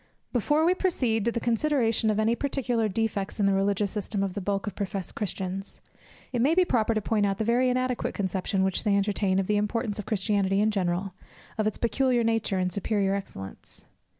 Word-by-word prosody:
_ - - -39
Before 295 +6 +2
we 355 - +4
proceed 250 - 0
to 235 - +2
the 235 - -2
consideration 235 -2 +1
of 215 0 +1
any 220 +2 +3
particular 245 -5 0
defects 205 -1 -2
in 205 - +3
the 195 - +3
religious 200 0 +1
system 205 -1 -2
of 195 -2 -2
the 200 - -4
bulk 195 +1 -1
of 205 - -4
professed 195 -2 -4
Christians, 195 -1 -4 0.5
it 240 - +1
may 295 +6 +3
be 365 0 +5
proper 230 -6 +1
to 215 - +1
point 210 -2 +1
out 195 -1 -1
the 220 - -1
very 245 +3 +2
inadequate 255 0 -1
conception 190 0 -1
which 190 -1 0
they 200 -2 +3
entertain 200 -1 +1
of 195 - +1
the 210 +2 +1
importance 210 +1 -1
of 210 - -6
Christianity 200 -2 +1
in 215 +1 +3
general, 185 -1 -1 0.5
of 215 - +2
its 215 - -2
peculiar 245 0 +1
nature, 225 -3 0
and 185 -1 -1
superior 200 -1 0
excellence. 95 - -8
210 Hz, 205 wpm, -27 LUFS, 195-235 Hz, 0.5 s, be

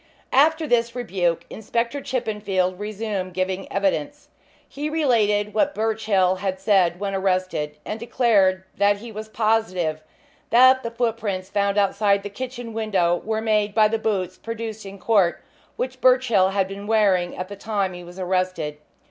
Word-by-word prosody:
After 315 +4 +4
this 235 -3 +1
rebuke 175 -8 -1
Inspector 235 +5 -2
Chippenfield 210 -8 -1
resumed 205 -3 -4
giving 185 +1 -2
evidence. 195 -6 -1 0.4
He 295 +2 -4
related 215 -9 +1
what 290 +7 +1
Birchill 210 -4 +1
had 190 0 -3
said 190 -3 +2
when 200 -1 -3
arrested, 185 -6 -1
and 215 - -4
declared 215 -6 +2 0.2
that 205 0 +4
he 230 +3 -9
was 215 0 -7
positive 215 -8 0 0.5
that 255 +2 +6
the 230 - -4
footprints 225 -5 -2
found 200 0 +1
outside 200 0 +2
the 205 - -6
kitchen 245 0 -6
window 190 -6 +1
were 220 0 -2
made 210 -2 +1
by 215 -1 +6
the 225 +1 -1
boots 185 -5 -2
produced 225 -2 -6
in 195 +1 -9
court 195 -4 +2 0.4
which 255 0 -4
Birchill 250 -7 +4
had 195 -1 0
been 200 +1 -8
wearing 195 -5 +2
at 185 - -4
the 200 - -8
time 200 -2 -2
he 175 0 -9
was 175 +1 -12
arrested. 185 -5 -2
205 Hz, 155 wpm, -23 LUFS, 185-225 Hz, 0.5 s, that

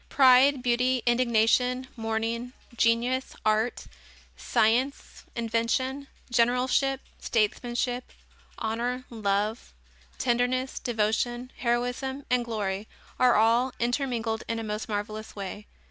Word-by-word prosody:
Pride, 265 0 +6
beauty, 250 0 +2
indignation, 245 +1 +2
mourning, 225 +2 -2 0.2
genius, 235 +3 +1
art, 215 +3 +1 0.5
science, 245 +6 0
invention, 240 +4 -1 0.2
generalship, 250 +3 +2 0.2
statesmanship, 240 +3 -1 0.5
honor, 240 +3 -2
love, 210 0 -1 0.4
tenderness, 255 +1 0
devotion, 240 +2 -1
heroism 245 +3 -1
and 250 -1 +3
glory 210 -3 -3 0.3
are 250 -1 +5
all 235 +4 +3
intermingled 240 -3 -1
in 230 - -2
a 225 - -3
most 215 +1 -4
marvelous 215 +1 -4
way. 205 +1 -6
240 Hz, 95 wpm, -27 LUFS, 225-255 Hz, 0.5 s, Pride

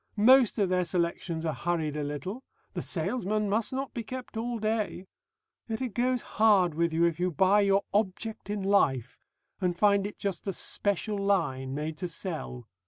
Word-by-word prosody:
Most 250 +2 +6
of 200 -4 +2
their 180 0 +2
selections 170 -1 -2
are 160 - 0
hurried 155 +1 -1
a 150 - -2
little. 150 - -5 0.3
The - - -3
salesman 215 -3 -1
must 215 +2 0
not 270 +1 -3
be 235 - -3
kept 255 +2 -7
all 235 +2 -2
day.... 215 -4 -2 0.6
Yet 220 - -2
it 255 -5 -3
goes 250 +2 +1 0.2
hard 195 -6 +5
with 170 +2 +1
you 165 +1 +1
if 170 -1 0
you 180 +1 +1
buy 190 +5 +4
your 200 0 +3
Object 210 +1 -1
in 205 -1 -2
Life 135 - +2 0.4
and 180 -2 0
find 200 0 +3
it 205 - -10
just 200 0 -4
a 195 - 0
'special 205 +3 -1
line' 140 -10 0
made 155 +1 -4
to 180 - -2
sell.... 155 - -5
195 Hz, 180 wpm, -29 LUFS, 170-215 Hz, 0.6 s, Most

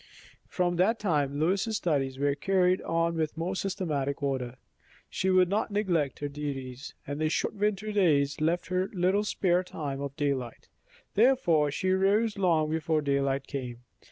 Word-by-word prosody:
From 175 -1 0
that 210 +6 +3
time 145 -8 0
Lois's 195 +7 +1
studies 135 -7 -1
were 140 +1 +1
carried 185 +4 +2
on 165 0 0
with 160 -1 -2
more 175 +3 -2
systematic 155 -9 -2
order. 130 -3 -2 0.6
She 190 - 0
would 185 -1 +5
not 205 +4 0
neglect 175 - 0
her 145 - -1
duties, 140 -3 -6
and 145 +2 -5
the 155 - +2
short - - -1
winter 210 0 -1
days 150 -8 +2
left 165 +2 0
her 185 +1 0
little 190 +2 +2
spare 180 -3 +1
time 140 -6 -5
of 140 -1 -5
daylight; 135 -5 -3 0.4
therefore 200 - +3
she 185 +6 -1
rose 205 +4 +2
long 165 -6 +2
before 160 -1 0
daylight 140 -1 0
came. 125 -4 -6
165 Hz, 155 wpm, -28 LUFS, 140-190 Hz, 0.6 s, would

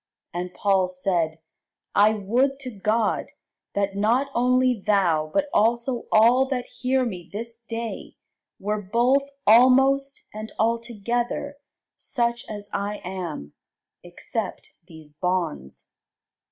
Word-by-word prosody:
And 175 +1 -4
Paul 195 -2 +2
said, 180 -3 -1 0.6
I 210 +2 +5
would 250 +7 +1
to 255 -2 -5
God, 215 +2 0 0.5
that 200 -1 0
not 240 +7 +1
only 255 +1 +3
thou, 175 -7 +2
but 295 - +1
also 235 +3 +1
all 240 +5 +5
that 255 -2 -2 0.2
hear 260 0 +2
me 180 -7 -6
this 230 +2 -6
day, 230 -1 -6 0.4
were 210 +2 -2
both 245 +8 +2 0.2
almost, 265 +4 +5
and 215 +1 -7
altogether 235 +4 -1 0.4
such 235 -2 -2
as 205 -1 -7
I 205 +1 -2
am, 175 - -6 0.5
except 185 +4 -5 0.2
these 160 -4 -14
bonds. 170 - -3
220 Hz, 115 wpm, -24 LUFS, 190-245 Hz, 0.6 s, I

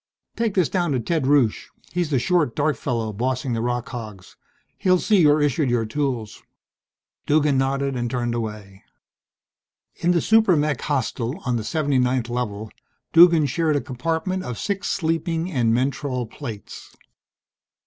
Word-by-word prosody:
"Take 230 -3 -1
this 180 -5 +3
down 175 -5 0
to 130 - 0
Ted 145 +3 -1
Rusche, 135 -6 +2 0.2
he's 175 -3 -1
the 140 - +1
short, 150 -2 +1
dark 150 0 +1
fellow 115 -4 -3
bossing 125 +3 -2
the 115 - -1
rock 120 0 -2
hogs. 110 -7 -9 0.4
He'll 185 -1 +3
see 205 +1 +3
you're 150 -1 +4
issued 145 -1 +1
your 120 -2 +1
tools." 120 -3 -3 0.9
Duggan 145 -2 +3
nodded 135 0 0
and 120 -1 -2
turned 120 -1 -2
away. 105 -4 -6 1.1
In 170 - 0
the 175 -1 +4
super 220 0 +4
mech 150 -1 0
hostel, 135 - -2
on 125 -2 0
the 115 - -1
79th 130 -3 0
Level, 110 -3 -4 0.4
Duggan 170 -2 +7
shared 155 +3 0
a - - +2
compartment 165 +8 -2
of 125 -9 -5
six 200 - -3
sleeping 165 +1 -1
and 120 -7 +1
mentrol 130 +1 -1
plates. 115 -4 -9
135 Hz, 150 wpm, -23 LUFS, 120-160 Hz, 1.1 s, Duggan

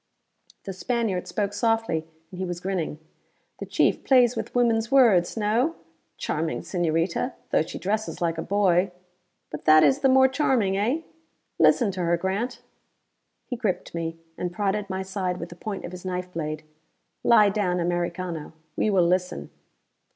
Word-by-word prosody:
The 195 - -5
Spaniard 220 -2 -1
spoke 205 -1 -2
softly, 225 -7 0 0.2
and 185 - -9
he - - -1
was 175 -1 -4
grinning. 180 -5 -3 0.6
"The - - -6
chief - - +1
plays 250 -2 +4
with - - -5
woman's 230 -2 +2
words, 230 -9 +4
no? 230 +9 +1 0.4
Charming 160 +1 -2
señorita, 175 +7 -1 0.2
though - - +4
she 160 - -5
dresses 215 +3 -2
like 165 -2 -1
a - - -1
boy. 190 -1 +2 0.6
But 150 - -7
that 155 0 +7
is 140 -3 +4
the 270 - +3
more 265 0 +6
charming, 260 -8 +1
eh? 235 +11 0 0.6
Listen 230 -6 +4
to 185 - -7
her, 170 0 +2
Grant." 200 +8 -3 0.8
He 250 - -4
gripped 215 -6 -2
me, 165 -1 -3 0.2
and 180 -1 -2
prodded 200 +2 -1
my 190 0 -3
side 190 -2 -3
with 170 - -6
the 175 - -10
point 200 +2 -5
of 175 - -7
his 180 -1 -9
knife 180 -1 -4
blade. 155 -1 -4 0.6
"Lie 210 -3 +6
down 195 -3 0
Americano: 175 -2 -3 0.2
we - - +1
will 190 -4 +3
listen." 180 +1 -1
190 Hz, 160 wpm, -25 LUFS, 175-220 Hz, 0.8 s, that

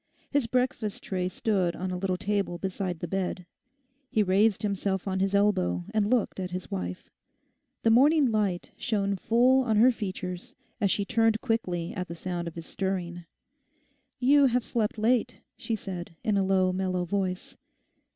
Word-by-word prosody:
His 285 -5 +1
breakfast 250 -4 -1
tray 185 -1 -2
stood 185 -3 0
on 185 +1 -4
a - - -2
little 185 0 -1
table 200 -3 -1
beside 185 -2 -3
the 175 - -3
bed. 180 0 -2 0.6
He 220 -5 +2
raised 200 +3 +2
himself 200 -1 -1
on 190 -1 -1
his 195 +1 +1
elbow 90 - +2
and 210 -1 +2
looked 240 -5 +1
at 185 -1 -3
his 180 0 -6
wife. 90 -1 -5 0.7
The 225 - +4
morning 285 +5 +5
light 200 -5 -1
shone 200 -4 0
full 245 +7 +4
on 220 -4 +1
her 245 +4 +7
features 185 -5 -5 0.2
as 200 -3 +2
she 200 +1 +1
turned 225 +1 +2
quickly 180 -9 -1
at 180 -2 -5
sound 175 0 -4
of 170 - -7
his 165 -1 -7
stirring. 175 -3 -3 0.9
'You 275 +2 +5
have 250 -1 +1
slept 225 -2 -1
late,' 240 +2 +1 0.2
she 225 - -3
said, 180 -5 -7
in 215 -3 +1
a 195 - +2
low, 190 -1 +2
mellow 185 -1 -1
voice. 185 0 -2
195 Hz, 165 wpm, -28 LUFS, 180-225 Hz, 0.9 s, her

